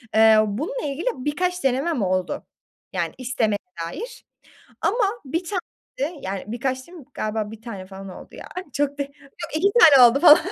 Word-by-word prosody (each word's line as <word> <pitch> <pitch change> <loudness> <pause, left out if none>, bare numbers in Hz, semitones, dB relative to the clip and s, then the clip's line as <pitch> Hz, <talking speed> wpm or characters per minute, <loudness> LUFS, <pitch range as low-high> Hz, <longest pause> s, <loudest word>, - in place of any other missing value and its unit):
Eee, 220 0 +7
bununla 300 - -3
ilgili 290 - -4
birkaç 360 +6 -2
denemem 270 +1 +1
oldu, 185 -1 -1 0.5
yani - - -1
istemeye 235 -5 0 0.3
dair. 475 - -8 0.6
Ama 430 +1 +2 0.2
1 330 +7 -2
tane 365 +1 -2 0.4
de, 310 +5 -1
yani, 190 0 -4
birkaç 255 +4 -3
diyeyim 340 -7 -12
galiba 215 0 -2
1 225 0 -11
tane 200 -6 -7
falan 195 0 -9
oldu - - -11
ya - - -9 0.3
çok 285 0 0
da - - +2
yok 280 - -13 0.4
2 395 +6 +3
tane 280 - +9
oldu 275 +4 0
falan. 310 -1 +9
270 Hz, 165 wpm, -23 LUFS, 220-335 Hz, 0.6 s, tane